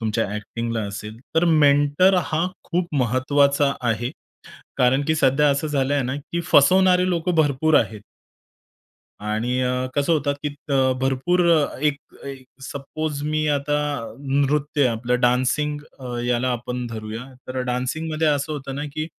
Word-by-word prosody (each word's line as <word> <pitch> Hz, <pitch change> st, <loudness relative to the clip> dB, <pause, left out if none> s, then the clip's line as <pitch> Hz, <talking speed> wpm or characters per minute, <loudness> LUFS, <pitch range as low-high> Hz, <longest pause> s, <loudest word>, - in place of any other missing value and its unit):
तुमच्या 110 Hz, 0 st, 0 dB
ॲक्टिंगला 115 Hz, +2 st, -4 dB
असेल, 105 Hz, +2 st, -7 dB, 0.2 s
तर 170 Hz, -, +4 dB
मेंटर 145 Hz, +3 st, +4 dB
हा 160 Hz, +3 st, 0 dB, 0.2 s
खूप 175 Hz, -2 st, -2 dB
महत्त्वाचा 140 Hz, +3 st, +2 dB, 0.2 s
आहे. 120 Hz, +3 st, -2 dB, 0.7 s
कारण 130 Hz, +2 st, +3 dB
की 160 Hz, -, +2 dB
सध्या 145 Hz, +1 st, +3 dB
असं 140 Hz, +3 st, 0 dB
झालंय 140 Hz, -1 st, 0 dB
ना, 130 Hz, +2 st, -2 dB
की 170 Hz, +4 st, -4 dB
फसवणारे 185 Hz, +5 st, +5 dB
लोक 175 Hz, 0 st, -1 dB
भरपूर 150 Hz, +1 st, +2 dB
आहेत. 105 Hz, -2 st, -4 dB, 1.3 s
आणि 120 Hz, +4 st, -1 dB
अ, 125 Hz, 0 st, 0 dB
कसं 145 Hz, +3 st, +1 dB
होतं, 145 Hz, -2 st, +1 dB
की 150 Hz, -, -1 dB, 0.2 s
अ, 130 Hz, -1 st, +3 dB
भरपूर 135 Hz, +7 st, +1 dB, 0.4 s
एक 150 Hz, -2 st, +2 dB, 0.3 s
एक 135 Hz, -2 st, -8 dB, 0.2 s
सपोज 145 Hz, +2 st, -5 dB
मी 155 Hz, +1 st, -1 dB
आता, 145 Hz, +1 st, 0 dB, 0.4 s
नृत्य 140 Hz, +1 st, +1 dB
आपलं 125 Hz, +1 st, -1 dB
डान्सिंग 130 Hz, +4 st, +1 dB, 0.5 s
याला 125 Hz, +1 st, 0 dB
आपण 125 Hz, +1 st, -4 dB
धरूया. 110 Hz, +1 st, -6 dB, 0.2 s
तर 130 Hz, 0 st, -3 dB
डान्सिंगमध्ये 155 Hz, +6 st, -2 dB
असं 145 Hz, +1 st, 0 dB
होतं 135 Hz, -2 st, -5 dB
ना, 145 Hz, +2 st, -4 dB
की 155 Hz, 0 st, -2 dB
140 Hz, 140 wpm, -22 LUFS, 125-150 Hz, 1.3 s, फसवणारे